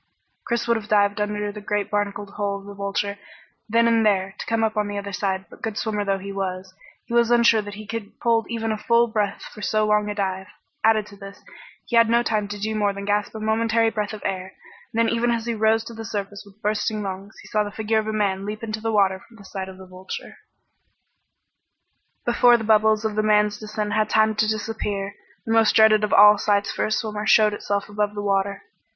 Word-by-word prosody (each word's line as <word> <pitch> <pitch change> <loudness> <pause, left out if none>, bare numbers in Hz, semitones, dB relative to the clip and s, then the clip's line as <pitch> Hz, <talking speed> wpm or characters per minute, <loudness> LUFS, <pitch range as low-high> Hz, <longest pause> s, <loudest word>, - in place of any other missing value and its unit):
Chris 235 0 -1
would 235 -1 +3
have 215 -1 -7
dived 205 0 +2
under 210 0 -2
the 210 0 -9
great 205 0 -2
barnacled 205 -1 -2
hull 200 -1 -2
of 200 - -13
the 205 - -9
Vulture 200 0 -3 0.5
then 230 +1 +4
and 230 -1 +3
there, 195 -2 +1
to - - -5
come 225 0 +1
up 220 0 0
on 210 -1 0
the 205 0 -4
other 200 0 -5
side, 190 0 -2
but - - -16
good 220 -2 -4
swimmer 210 -2 -1
though 195 -1 0
he 195 +1 -7
was, 190 -1 -4 0.3
he - - -8
was 235 -1 +4
unsure 235 -2 +5
that 205 -1 -8
he 215 +1 -9
could 215 0 -6
hold 230 -1 +1
even 225 -1 -2
a 215 - -3
full 235 +2 +3
breath 215 -3 -2
for 210 - -11
so 215 +1 +1
long 210 0 +2
a 205 - -3
dive. 190 -2 -2 0.4
Added 220 -1 +4
to 205 -1 -14
this, 195 0 -11 0.4
he 240 - -3
had 230 -1 +6
had - - -1
no 235 +1 +4
time 215 -3 0
to 205 0 -6
do 215 +2 -2
more 205 -2 +1
than 200 0 -7
gasp 205 +1 -1
a - - -5
momentary 225 +1 +1
breath 210 -1 -2
of 215 -2 -8
air, 190 -1 -4 0.4
and 230 0 +2
even 230 +1 +1
as 230 -1 -1
he 235 - -1
rose 220 0 +2
to 230 - -9
the 225 0 -7
surface 205 -2 -5
with 200 +1 -19
bursting 210 0 -1
lungs, 195 +2 -7
he - - -14
saw 210 0 +1
the 205 - -5
figure 220 +1 0
of 215 - -4
a - - -1
man 200 -3 0
leap 210 +2 -6
into 215 -1 -4
the 225 0 -1
water 195 -3 +2
from 230 - -19
the 200 - -15
side 190 0 -6
of 190 - -11
the 190 - -11
Vulture. 185 +1 -8 1.9
Before 240 0 +5
the 225 - -5
bubbles 215 0 +3
of 220 - 0
the 215 - +1
man's 210 -1 +2
descent 215 -1 -4
had 210 - 0
had 215 0 +1
time 220 0 +3
to 215 - +2
disappear, 210 -2 -3 0.3
the 225 - 0
most 225 -1 +4
dreaded 215 -1 +6
of 210 - 0
all 210 0 +7
sights 200 -1 +1
for - - -1
a - - -5
swimmer 215 -1 -2
showed 215 -1 +5
itself 200 -1 -2
above 205 0 -2
the 205 - -4
water. 200 0 0
210 Hz, 240 wpm, -23 LUFS, 200-220 Hz, 1.9 s, all